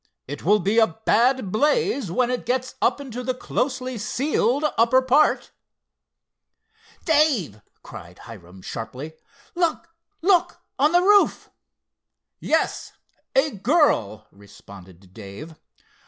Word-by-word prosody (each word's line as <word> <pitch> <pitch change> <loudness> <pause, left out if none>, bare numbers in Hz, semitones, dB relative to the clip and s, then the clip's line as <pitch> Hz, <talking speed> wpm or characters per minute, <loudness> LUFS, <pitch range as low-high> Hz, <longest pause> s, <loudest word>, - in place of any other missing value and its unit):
It 145 +2 -7
will 205 +5 +4
be 205 +5 +1
a 220 - +5 0.2
bad 245 -3 +2
blaze 290 - 0
when 245 +6 0
it 250 - -4
gets 255 +1 -2
up 250 - +1
into 250 -3 -7
the 255 0 -3
closely 255 -1 -3
sealed 265 +5 0
upper 235 +3 +4
part." 260 +4 +2 1.5
"Dave," 285 - +1 0.2
cried 85 +1 -12
Hiram 95 -4 -13
sharply—"look, 275 - -5 0.3
look, 365 -1 +2 0.2
on 295 +3 +3
the 350 +1 +3
roof!" 405 +1 +3 0.9
"Yes—a 305 -2 -2
girl," 200 - +1
responded 95 -2 -16
Dave. 110 +11 -10
245 Hz, 105 wpm, -22 LUFS, -, 1.5 s, a